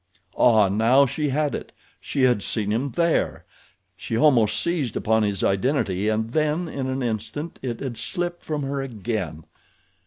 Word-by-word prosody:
Ah, 110 -4 +5
now 115 +8 +4
she 150 +3 -2
had 145 +1 0
it! - - -5 0.3
She 135 - -2
had 125 -5 +4
seen 105 0 -2
him 125 +6 0
there! 170 +2 0 0.5
She 115 - -3
almost 120 -5 +4
seized 160 -9 -1
upon 110 0 +2
his 100 -3 -1
identity 100 -2 +1
and 110 +1 -1
then 155 +4 0
in 135 -4 -4
an 130 0 -2
instant, 120 +8 -4
it 120 -3 -4
had 125 -4 -4
slipped 175 -1 -3
from 150 -2 -3
her 140 0 -2
again. 105 - -4
125 Hz, 160 wpm, -24 LUFS, 110-145 Hz, 0.5 s, Ah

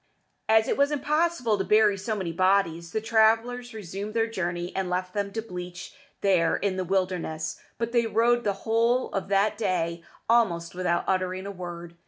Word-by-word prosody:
As 220 0 +5
it - - 0
was 280 +1 +3
impossible 295 -6 +1
to - - +1
bury 210 0 +4
so 200 +3 -3
many 185 -5 -3
bodies, 170 -2 +1
the 220 - -1
travellers 230 +2 +2
resumed 205 0 -6
their 225 -1 +3
journey, 175 -5 -3
and 190 -1 -1
left 185 0 -2
them 200 -1 -2
to 225 - -3
bleach 180 -4 -8 0.3
there 180 -4 +3
in 200 -1 -1
the 185 - -1
wilderness; 180 -4 -2 0.2
but 230 0 -2
they 235 -1 +2
rode 240 +2 +2
the 200 - +1
whole 230 +3 +2
of 195 - -3
that 200 +3 +1
day 170 -5 -1 0.3
almost 190 -8 +2
without 180 -1 0
uttering 185 0 -1
a 200 - -4
word. 175 -2 -8
195 Hz, 180 wpm, -26 LUFS, 180-225 Hz, 0.3 s, As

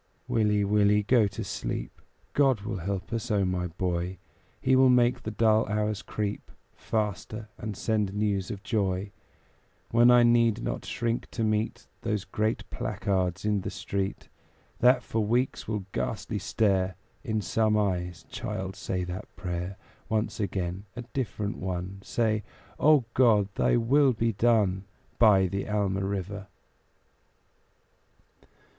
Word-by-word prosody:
Willie, 105 -2 +2
Willie, 105 +1 +3
go 115 -1 +4
to 100 - -5
sleep; - - -5 0.3
God 135 -6 +3
will 105 -2 -4
help 95 +5 -4
us, 115 -1 -3
O 100 -3 +2
my 90 -1 -1
boy! 90 +1 -2 0.4
He 130 0 +3
will 130 0 +6
make 125 0 +4
the 110 - -4
dull 110 0 +3
hours 105 -1 -1
creep 105 +3 -4 0.2
Faster, 110 0 -3
and 105 -2 -5
send 105 -3 0
news 100 -2 -1
of 100 -3 -6
joy; 100 -3 -1 0.8
When 120 +1 +6
I 120 0 +7
need 115 -1 +3
not - - -3
shrink 115 0 -2
to 115 - -3
meet 110 +1 -1 0.2
Those 105 -4 -2
great 110 +1 -1
placards 95 -2 -1
in 105 -2 +1
the - - -4
street, 100 0 -3 0.5
That 125 +1 +5
for 110 -1 -1
weeks 120 +5 0
will 105 -3 -2
ghastly - - -3
stare 95 -4 +1 0.3
In 110 -5 -1
some 105 +2 +1
eyes 90 -4 -1
child, 95 0 -4
say 90 -1 -3
that 90 +1 -6
prayer 90 +1 -4 0.3
Once 110 0 -1
again 95 -1 -2
a 120 - -5
different 110 -5 -2
one 95 +1 -4
Say 110 0 0 0.4
"O 150 -5 +5
God! 110 -6 +4
Thy - - +2
will 130 +3 +4
be 115 0 0
done, 100 -4 +2 0.3
By 105 -5 +6
the 100 +3 -3
Alma 100 -2 0
River." 100 0 -4
105 Hz, 140 wpm, -28 LUFS, 95-115 Hz, 0.8 s, I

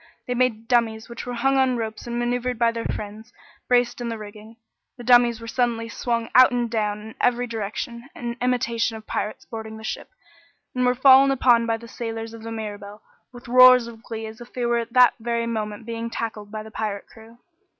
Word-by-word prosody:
They 250 - -2
made 240 -3 0
dummies 225 -2 +1
which 235 +1 -8
were 245 - -3
hung 270 +3 +2
on 260 -2 +2
ropes 220 0 -5
and 235 0 -3
maneuvered 245 0 -1
by 230 0 +3
their 230 0 -5
friends, 215 +3 -6 0.4
braced 245 0 +2
in 235 - -3
the 230 - -4
rigging. 215 +1 -11 0.4
The 245 - -9
dummies 240 -1 +5
were 230 - -9
suddenly 230 -1 -1
swung 230 0 -2
out 255 +1 +8
and 240 -2 -1
down 210 -2 -1
in 220 +1 -11
every 245 0 +2
direction, 235 +2 -5
in 235 -1 -5
imitation 235 -2 0
of 215 - -13
pirates 210 - -4
boarding 220 -1 -7
the 220 - -11
ship, - - -5 0.6
and 250 -1 +1
were 250 - +2
fallen 265 +1 +7
upon 245 -3 +3
by 225 0 +1
the 235 +1 -12
sailors 225 -1 -6
of 230 - -10
the 225 +1 -7
Mirabelle 210 -2 -7 0.3
with 245 -1 -13
roars 255 0 +8
of 230 -1 -11
glee 225 -2 -6
as 220 +1 -10
if 240 - -11
they 245 -1 -2
were 235 0 +2
at 230 0 -6
that 250 -1 +6
very 235 0 -1
moment 215 -1 -4
being 230 0 -4
tackled 220 -3 -5
by 215 0 -5
the 220 - -12
pirate 210 -2 -4
crew. 225 +1 -16
230 Hz, 210 wpm, -23 LUFS, 220-245 Hz, 0.6 s, out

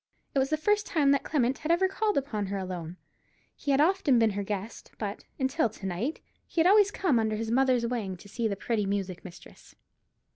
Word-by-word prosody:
It 275 - +2
was 265 0 +1
the 310 - +1
first 415 +6 +1
time 290 -4 +3
that 280 - +2
Clement 260 -3 0
had 310 - -1
ever 360 +3 +4
called 420 +2 0
upon 225 -8 -1
her 200 +1 -3
alone. 180 -2 -5 0.6
He 290 - -6
had 275 0 +4
often 320 -5 +3
been 225 -2 +4
her 200 +1 -3
guest; 205 +2 -5
but, 205 -2 -5
until 265 -1 +1
to 210 -2 -11
night, 195 - -3 0.3
he - - -3
had 325 - +5
always 405 +1 +6
come 360 - +1
under 220 -1 0
his 225 +1 -3
mother's 255 -1 +3
wing 220 -6 -3
to 205 - -14
see 230 +3 -2
the 200 - -2
pretty 210 0 -1
music 195 -3 -3
mistress. 175 - -14
240 Hz, 215 wpm, -28 LUFS, 200-300 Hz, 0.6 s, always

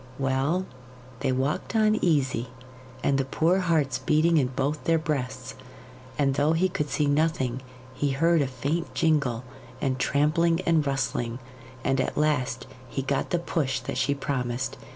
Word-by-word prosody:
Well, 135 +7 0 0.5
they 135 0 0
walked 135 - -1
on 215 -1 +4
easy, 135 -7 +1 0.6
and 140 -1 +2
the - - +2
poor 165 +7 +2
hearts 155 -8 +1
beating 160 +4 +3
in 135 -4 +3
both 140 +4 -2
their 165 0 +4
breasts; 130 -5 -3 0.6
and 140 -2 +2
though 145 +3 +2
he 180 +3 +2
could 150 -4 -2
see 150 - +1
nothing, 145 -4 +1 0.3
he 140 +2 -1
heard 165 +4 +3
a 140 - +1
faint 140 +7 -3
jingle 140 -7 +1 0.4
and 130 -2 -1
trampling 165 +4 +2
and 165 -5 +2
rustling, 120 -3 -1 0.5
and 135 0 +2
at - - -3
last 130 -6 0 0.2
he 135 - -3
got 135 0 -1
the 175 - +1
push 145 -6 -1
that - - -4
she 140 - +1
promised. 130 -3 -2
140 Hz, 155 wpm, -26 LUFS, 130-160 Hz, 0.6 s, on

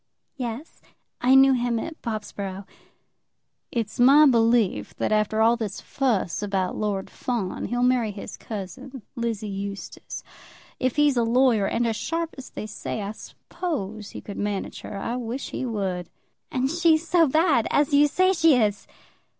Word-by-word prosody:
"Yes; 250 +3 -6 0.4
I 255 +2 +5
knew 270 0 +7
him 240 -2 0
at 315 +8 -6
Bobsborough." 200 -3 -5 1.1
"It's 230 -3 -3
my 275 +5 +8
belief 230 -5 +2
that - - -1
after 215 +1 +2
all 230 +1 +5
this 220 -4 -4
fuss 230 -11 -1
about 195 -3 -1
Lord 205 -2 -2
Fawn, 225 -7 -3
he'll 245 0 -1
marry 250 -3 +3
his 205 0 -7
cousin, 230 +5 -8
Lizzie 230 -3 -2
Eustace. 200 0 -6 0.6
If 255 -2 0
he's 295 -3 +3
a 235 - +3
lawyer, 230 -3 +3
and 240 - 0
as 225 -2 0
sharp 330 +8 -2
as 265 - -9
they - - -6
say, 215 0 -5
I 200 - -3
suppose 220 - -5
he - - -8
could 200 - -8
manage 205 -1 -3
her. 200 - -7
I 230 +5 -3
wish 245 +2 -4
he 260 - -3
would." 190 -6 -3 0.4
"And 265 +1 0
she 335 -1 +4
so 330 0 +3
bad 310 -4 +3
as 290 0 +2
you 290 +1 +6
say 370 +6 +3
she 325 -5 +5
is!" 210 -4 +1
235 Hz, 160 wpm, -25 LUFS, 210-270 Hz, 1.1 s, my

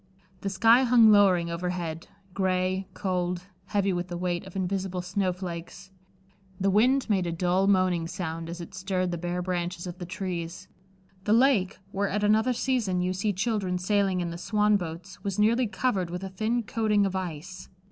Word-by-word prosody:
The 195 - -3
sky 225 +6 +5
hung 235 -3 +6
lowering 185 -5 +4
overhead, 170 -2 -3 0.3
gray, 185 0 0
cold, 180 -2 -1 0.2
heavy 200 -1 0
with 175 0 -2
the 175 -1 -5
weight 175 0 -2
of 190 - -12
invisible 190 -1 -2
snowflakes. 180 -1 -4 0.7
The 195 0 +2
wind 250 +7 +3
made 190 -5 +1
a - - -1
dull 180 +3 +1
moaning 185 -4 +2
sound, 165 -1 -5
as 170 +1 -6
it 175 +4 -9
stirred 185 -1 -1
the 175 - -3
bare 175 +1 -2
branches 175 -1 -3
of 180 0 -7
the 175 - -6
trees. 180 -2 -5 0.6
The 210 - +3
lake, 230 -6 +3
where 200 0 -1
at 210 +2 -1
another 220 +4 +3
season 230 -7 0
you 180 +1 0
see 200 +3 0
children 200 -2 -1
sailing 190 0 +1
in 170 -1 -3
the 170 - -7
swan 210 +2 +2
boats, 175 +1 -5
was 200 -2 -2
nearly 230 +4 +3
covered 195 -3 -1
with 180 +2 -5
a 190 - -4
thin 220 +5 -1
coating 210 -2 +1
of 190 -1 -2
ice. 180 0 -6
185 Hz, 175 wpm, -27 LUFS, 180-205 Hz, 0.7 s, hung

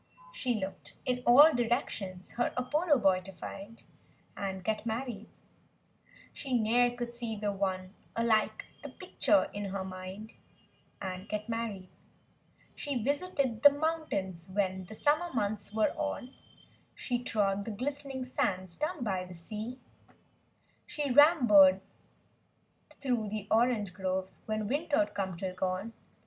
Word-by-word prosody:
She 255 - 0
looked 190 -2 -5
in 250 -1 0
all 290 +6 +9
directions 225 -6 -2
her 240 - 0
Apollo 295 +5 +2
boy 185 -2 +4
to 195 +1 -9
find— 195 +4 -9 0.5
And 190 -2 -4
get 215 +1 -1
married; 225 -1 -4 1.0
She 260 -3 -1
ne'er 240 +2 +3
could 240 -1 -4
see 235 -2 -4
the 205 0 -1
one 190 -1 -2 0.2
alike 230 -2 +1 0.2
the - - -7
picture 305 -2 +1
in 205 0 -4
her 195 0 -3
mind— 190 +3 -8 0.7
And 185 0 -6
get 210 0 -3
married; 225 -5 -3 0.9
She 275 -6 -2
visited 280 -4 0
the 285 - +10
mountains 285 - -2
when 190 -1 -1
the 220 - -10
summer 305 +8 +1
months 205 -2 -1
were 215 0 +2
on; 280 -3 -3 0.6
She 245 -1 -2
trod 200 -3 0
the - - -4
glist'ning 270 +4 -3
sands 185 -7 -1
down 305 -2 -2
by 190 -5 -1
the 180 0 -10
sea; 215 +8 -6 1.1
She 295 -2 -2
rambled 240 - +7 1.1
through 245 -6 -2
the 210 -1 -4
orange 225 -4 +2
groves 190 0 -3
when 215 -1 -1
win¬ 290 +8 -1
ter'd 305 +1 +2
come, 190 -3 -3
till 185 +1 -3
gone. 185 +4 -2
220 Hz, 135 wpm, -31 LUFS, 195-255 Hz, 1.1 s, the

